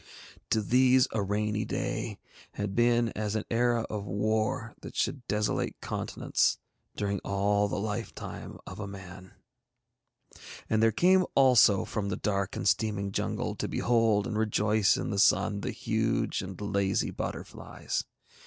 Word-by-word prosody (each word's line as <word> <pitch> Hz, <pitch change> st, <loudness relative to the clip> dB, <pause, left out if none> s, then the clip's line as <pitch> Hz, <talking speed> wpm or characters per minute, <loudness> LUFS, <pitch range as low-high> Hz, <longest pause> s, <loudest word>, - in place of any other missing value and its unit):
To 110 Hz, -, +2 dB
these 130 Hz, +3 st, +4 dB
a 110 Hz, -, 0 dB
rainy 105 Hz, +2 st, -1 dB
day -, -, -3 dB, 0.4 s
had 105 Hz, -1 st, -3 dB
been 120 Hz, +1 st, +3 dB
as 105 Hz, -1 st, -3 dB
an 110 Hz, -, -2 dB
era 120 Hz, 0 st, +2 dB
of 105 Hz, -2 st, -4 dB
war 110 Hz, +3 st, -1 dB
that -, -, -9 dB
should 130 Hz, +3 st, -1 dB
desolate 105 Hz, 0 st, -1 dB
continents -, -, 0 dB, 0.4 s
during 100 Hz, -1 st, -1 dB
all 100 Hz, +1 st, +1 dB
the 100 Hz, -, -3 dB
lifetime 105 Hz, 0 st, -5 dB
of 95 Hz, -, -9 dB
a 105 Hz, -, -4 dB
man. 95 Hz, -1 st, -10 dB, 1.3 s
And 110 Hz, 0 st, +1 dB
there 115 Hz, 0 st, +5 dB
came 185 Hz, -, +4 dB
out -, -, -4 dB
also 125 Hz, -7 st, +5 dB
from 100 Hz, -2 st, -3 dB
the 95 Hz, -, -2 dB
dark 100 Hz, -2 st, -1 dB
and -, -, -2 dB
steaming 100 Hz, -2 st, +1 dB
jungle -, -, -2 dB
to -, -, -2 dB
behold 115 Hz, -4 st, +2 dB
and 110 Hz, -3 st, -2 dB
rejoice 105 Hz, -1 st, +2 dB
in -, -, -3 dB
the 100 Hz, -, -1 dB
Sun 100 Hz, 0 st, +3 dB
the -, -, -3 dB
huge -, -, -1 dB
and 95 Hz, -1 st, -7 dB
lazy 100 Hz, -2 st, 0 dB
butterflies. -, -, -4 dB
105 Hz, 150 wpm, -29 LUFS, 100-115 Hz, 1.3 s, there